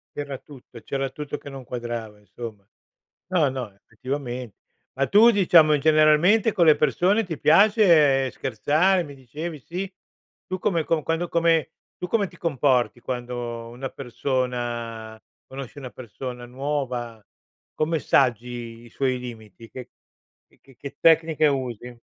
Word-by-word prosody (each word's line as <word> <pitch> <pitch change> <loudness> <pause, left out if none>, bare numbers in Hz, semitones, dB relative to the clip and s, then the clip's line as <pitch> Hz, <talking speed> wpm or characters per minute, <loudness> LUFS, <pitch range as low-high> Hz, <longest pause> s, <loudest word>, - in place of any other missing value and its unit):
C'era 145 -2 -5
tutto 125 -4 -14
c'era 135 0 -3
tutto 150 +2 -6
che 145 - -11
non 135 -1 -9
quadrava 120 -3 -6
insomma. 105 0 -10 0.6
No, 175 -6 +2
no, 130 -5 -5
effettivamente 125 +1 -6 0.4
Ma 135 +1 0
tu 220 - +6
diciamo 175 -7 +5
in 145 - +1
generalmente 155 +9 +4
con 170 -3 +3
le 155 - +7
persone 195 +8 +2
ti 165 -6 -6
piace 160 - +5
scherzare? 155 - +1
Mi 145 -2 -10
dicevi 150 +5 -7
sì 185 +7 -6 0.5
Tu 185 - -4
come 175 -4 0
con 160 -1 0
quando 165 +3 -1
come 165 -4 +2 0.3
tu 180 - -4
come 205 +1 +1
ti - - -17
comporti 130 -6 +1
quando 120 -1 -5
una 125 +3 -6
persona 120 -4 -4 0.3
conosci 135 0 -9
una 130 -3 -7
persona 125 +2 -8
nuova, 125 -4 -4 0.5
come 160 +1 0
saggi 120 -3 0
i 120 - -15
suoi 130 0 -1
limiti, 115 -3 -10
che 125 0 -9 0.6
che - - -29
che 135 -2 -21
che 140 - -9
tecniche 160 -1 +4
usi? 125 -4 -2
135 Hz, 140 wpm, -24 LUFS, 120-160 Hz, 0.6 s, le